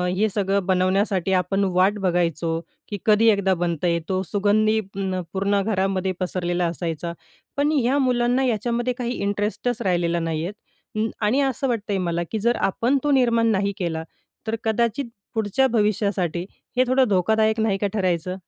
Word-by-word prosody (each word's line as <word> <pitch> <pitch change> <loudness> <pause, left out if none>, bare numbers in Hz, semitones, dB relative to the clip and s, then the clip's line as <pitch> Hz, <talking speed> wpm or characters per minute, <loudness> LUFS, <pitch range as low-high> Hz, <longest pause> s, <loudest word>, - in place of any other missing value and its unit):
हे 215 +3 +2
सगळं 195 -1 0
बनवण्यासाठी 190 0 +1
आपण 195 +2 +1
वाट 190 +3 +3
बघायचो, 170 -3 0 0.3
की 205 - -4
कधी 220 +1 +4
एकदा 200 -2 +3
बनता 175 -1 -1
येतो 170 +3 0
सुगंधी 215 +3 +2
अ, 190 -2 -3
पूर्ण 200 +1 +1
घरामध्ये 195 -2 0
पसरलेला 180 -1 -1
असायचा. 170 0 -3 0.4
पण 290 +2 +2
ह्या 270 -2 +2
मुलांना 250 0 +2
याच्यामध्ये 240 +2 0
काही 245 -2 -2
इंटरेस्टच 205 +4 -1
राहिलेला 175 -3 +1
नाही 165 -1 -2
आहेत. 200 - -4 0.4
अं, 220 +1 0 0.2
आणि 235 +7 +2
असं 270 0 0
वाटतंय 210 -4 -1
मला 175 -2 -1
की 220 - -1
जर 235 +3 +2
आपण 235 +8 +1
तो 295 - +1
निर्माण 235 -4 +3
नाही 200 0 +1
केला, 165 -3 -2 0.4
तर 220 - 0
कदाचित 235 +4 0 0.3
पुढच्या 220 +5 +2
भविष्यासाठी 200 -5 0 0.3
हे 255 - +6
थोडं 260 0 +3
धोकादायक 220 +4 +2
नाही 220 -3 +1
का 205 +1 0
ठरायचं? 185 -3 -1
200 Hz, 155 wpm, -23 LUFS, 180-225 Hz, 0.4 s, हे